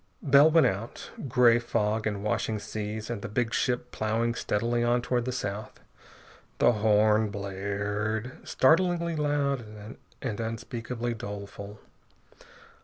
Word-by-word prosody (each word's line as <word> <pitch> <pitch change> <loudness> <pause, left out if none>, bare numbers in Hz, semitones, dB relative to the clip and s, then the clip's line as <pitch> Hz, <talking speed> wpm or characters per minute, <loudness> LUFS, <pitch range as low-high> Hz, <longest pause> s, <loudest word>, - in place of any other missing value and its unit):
Bell 140 +1 +7
went 165 0 +5
out. 100 +5 -3 0.2
Gray 120 -1 +5
fog, 110 -2 0
and 100 -2 -3
washing 105 +1 -1
seas, 105 +1 -5
and 115 -4 -4
the 120 - -5
big 115 +2 -1
ship 125 -1 0
ploughing 115 +2 0
steadily 120 +1 0
on 120 0 +2
toward 120 -1 0
the 130 - -1
south.... 105 -2 -5 0.8
The - - +5
horn 110 0 +3
blared, 100 +3 -3
startlingly 170 +3 +2
loud 145 -3 0 0.6
and 115 -5 -4
unspeakably 115 +1 -4
doleful. 100 -1 -7
115 Hz, 120 wpm, -28 LUFS, 105-125 Hz, 0.8 s, Bell